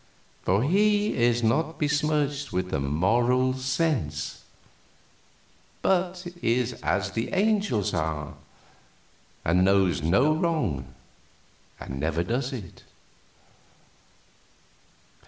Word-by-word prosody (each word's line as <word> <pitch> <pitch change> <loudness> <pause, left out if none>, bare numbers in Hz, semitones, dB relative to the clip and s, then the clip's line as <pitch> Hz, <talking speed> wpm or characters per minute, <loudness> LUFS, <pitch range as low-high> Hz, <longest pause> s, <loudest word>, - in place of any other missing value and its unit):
For 100 +5 +1
he 205 +6 +2
is 120 0 +2
not 155 +8 +1
besmirched 150 -1 0
with 90 0 -2
the - - 0
Moral 120 - +2
Sense, 130 - -2 1.4
but 180 -1 0 0.2
is 120 +1 +1
as 100 0 0
the 115 +3 -3
angels 200 - +1
are, 80 -3 -2 1.1
and 90 +3 +3
knows 95 -5 +3
no 110 - +3
wrong, 155 - -1 0.8
and 65 - -6
never 80 +3 0
does 125 +8 -2
it." 110 -10 -8
120 Hz, 90 wpm, -26 LUFS, 90-155 Hz, 1.4 s, and